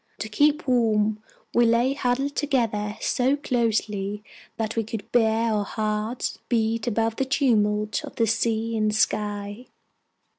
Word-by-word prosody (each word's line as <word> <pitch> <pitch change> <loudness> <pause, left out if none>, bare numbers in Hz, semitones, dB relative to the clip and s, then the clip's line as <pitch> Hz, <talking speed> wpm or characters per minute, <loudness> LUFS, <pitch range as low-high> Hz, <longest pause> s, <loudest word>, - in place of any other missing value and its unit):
To 220 - -5
keep 295 +7 +2
warm, 220 -4 +2 0.3
we 235 0 +4
lay 235 +3 +3
huddled 275 +1 -1
together 225 -7 0
so 260 +2 +1
closely 215 -6 -1 0.3
that 225 0 -2
we 225 - +1
could 220 -1 -7
bear 225 -1 +2
our 210 -1 +1
hearts 215 +3 -3
beat 225 -1 0
above 225 0 0
the - - +1
tumult 215 -6 +1
of - - -10
sea 225 +1 0
and 215 -1 +1
sky. 205 +1 -1
225 Hz, 135 wpm, -25 LUFS, 210-245 Hz, 0.3 s, we